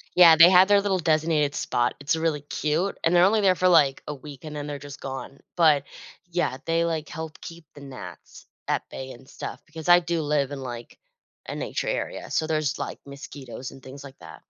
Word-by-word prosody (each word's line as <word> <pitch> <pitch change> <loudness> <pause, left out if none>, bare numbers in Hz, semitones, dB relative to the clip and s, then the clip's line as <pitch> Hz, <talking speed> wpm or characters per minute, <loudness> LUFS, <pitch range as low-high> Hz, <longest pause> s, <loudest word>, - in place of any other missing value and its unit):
Yeah, 170 -3 +8
they 165 +3 +9
had 185 +1 +6
their 205 -1 +5
little 195 -2 0
designated 155 -3 +1
spot, 120 0 0
it's 145 +3 -1
really 160 -3 -1
cute, 155 +6 -2
and 165 +2 +2
they're 175 +1 +6
only 215 +2 +3
there 190 -2 +4
for, 185 +1 +2
like, 145 -6 +4
a 150 - -4
week 145 +1 -12
and 150 -1 -7
then 145 0 -5
they're 145 -1 -5
just 145 0 -10
gone. 135 +1 -7 0.2
But, 150 -5 +4 0.5
yeah, 170 -7 -1
they, 165 0 +1
like, 160 -2 -2
help 160 0 -7
keep 165 -1 -10
the 145 - -12
gnats 135 -2 -11 0.2
at - - -1
bay 130 0 -7
and 130 +2 -15
stuff - - -8
because 160 +1 -9
I 175 0 +8
do 170 -1 -2
live 145 -2 0
in, 140 -1 -6
like, 120 -2 -8 0.5
a - - -4
nature - - -3
area, - - -4
so 155 - 0
there's, 155 -3 -1
like, - - -5
mosquitoes 140 -2 -9
and 135 - -14
things 140 +2 -11
like 135 -1 -12
that. - - -12
155 Hz, 215 wpm, -25 LUFS, 140-170 Hz, 0.5 s, they